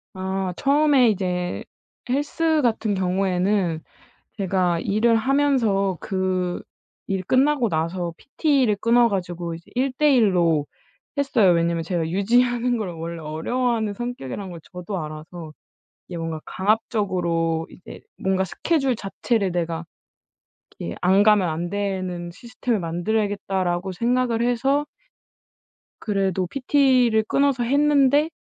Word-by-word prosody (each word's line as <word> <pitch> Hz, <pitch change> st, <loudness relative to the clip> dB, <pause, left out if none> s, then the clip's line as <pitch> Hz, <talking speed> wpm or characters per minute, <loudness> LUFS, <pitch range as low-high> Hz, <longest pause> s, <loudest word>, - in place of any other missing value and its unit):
아 190 Hz, -1 st, -2 dB
처음에 280 Hz, -3 st, +4 dB
이제 180 Hz, -3 st, -2 dB, 0.4 s
헬스 300 Hz, +4 st, +1 dB
같은 225 Hz, -4 st, 0 dB
경우에는 185 Hz, -2 st, 0 dB, 0.6 s
제가 185 Hz, -4 st, +1 dB
일을 225 Hz, +3 st, +2 dB
하면서 230 Hz, -8 st, +1 dB
그 185 Hz, -2 st, -2 dB, 0.5 s
일 190 Hz, -1 st, 0 dB
끝나고 260 Hz, -1 st, +2 dB
나서 170 Hz, +2 st, -2 dB
PT를 275 Hz, -8 st, +1 dB
끊어 235 Hz, +1 st, +4 dB
가지고 175 Hz, -4 st, -3 dB
이제 165 Hz, -, -13 dB
1 260 Hz, +1 st, 0 dB
대 300 Hz, -2 st, +4 dB
1 215 Hz, -7 st, +3 dB
로 160 Hz, -4 st, +2 dB, 0.5 s
했어요. 235 Hz, -10 st, +3 dB
왜냐하면 170 Hz, 0 st, +1 dB
제가 165 Hz, -1 st, -2 dB
유지하는 240 Hz, +5 st, +2 dB
걸 205 Hz, -5 st, -3 dB
원래 165 Hz, 0 st, -6 dB
어려워하는 220 Hz, +8 st, -1 dB
성격이란 200 Hz, -, -5 dB
걸 170 Hz, -2 st, -9 dB
저도 180 Hz, +1 st, -5 dB
알아서 155 Hz, +1 st, -8 dB, 0.5 s
이게 175 Hz, -2 st, -6 dB
뭔가 165 Hz, -1 st, -4 dB
'강압적으로 180 Hz, -6 st, 0 dB
이제 180 Hz, -, -12 dB, 0.2 s
뭔가 190 Hz, 0 st, 0 dB
스케줄 270 Hz, -, 0 dB
자체를 200 Hz, -2 st, -1 dB
내가 170 Hz, -1 st, -3 dB, 0.9 s
이렇게 85 Hz, -, -5 dB
안 190 Hz, +3 st, +4 dB
가면 210 Hz, -3 st, +4 dB
안 165 Hz, +2 st, -3 dB
되는 185 Hz, -3 st, -3 dB
시스템을 235 Hz, +2 st, -3 dB
만들어야겠다.'라고 190 Hz, 0 st, -1 dB
생각을 235 Hz, +3 st, 0 dB
해서 270 Hz, +5 st, +1 dB, 1.1 s
그래도 195 Hz, -3 st, -1 dB
PT를 255 Hz, -2 st, +3 dB
끊어서 275 Hz, -3 st, +2 dB
했는데 285 Hz, +2 st, +3 dB
195 Hz, 275 characters per minute, -23 LUFS, 175-245 Hz, 1.1 s, 처음에